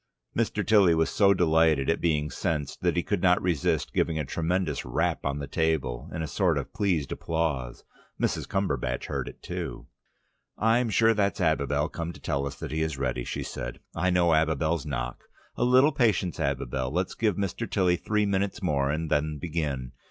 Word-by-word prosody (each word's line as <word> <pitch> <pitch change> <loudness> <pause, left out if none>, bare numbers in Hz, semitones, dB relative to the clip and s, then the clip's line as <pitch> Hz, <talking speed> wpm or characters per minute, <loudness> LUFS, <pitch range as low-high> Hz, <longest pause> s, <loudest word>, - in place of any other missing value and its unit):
Mr. - - 0
Tilly 100 -6 +5
was 80 0 +1
so 100 -2 +4
delighted 80 -6 +3
at 80 - +1
being 75 -3 +1
sensed, 75 -6 -2
that - - +1
he 85 - +2
could 100 -4 -1
not 90 -1 +4
resist 85 -6 0
giving 80 -2 +1
a 75 - -1
tremendous 85 0 -1
rap 60 - -1
on 70 +1 -1
the 70 - -4
table, 70 -3 -1
in 80 - -3
a - - -3
sort - - +1
of - - -4
pleased 85 -9 0
applause. 75 -7 -2 0.4
Mrs. - - -1
Cumberbatch 95 -10 -1
heard - - -3
it - - -11
too. - - -5 0.7
"I'm 115 +2 +2
sure 115 +2 +4
that's 100 -1 0
Abibel 75 -3 +1
come 85 0 -5
to - - -13
tell 70 0 -1
us 70 - -6
that 80 -1 -7
he 80 +1 -1
is 80 -3 -1
ready," 65 -2 -1
she - - -4
said. - - -6
"I 95 +2 +1
know 90 -2 +3
Abibel's 80 0 +1
knock. 65 -3 -4 0.3
A - - 0
little 130 +4 +5
patience, 105 - +1
Abibel. 65 +1 -1
Let's 90 +3 -1
give 110 -4 +1
Mr. 100 +4 -3
Tilly 90 -3 +2
three 105 +3 0
minutes 100 +1 0
more 70 -6 +1
and 80 +2 -2
then 75 +1 +1
begin. 75 -6 -3
80 Hz, 190 wpm, -27 LUFS, 70-95 Hz, 0.7 s, Tilly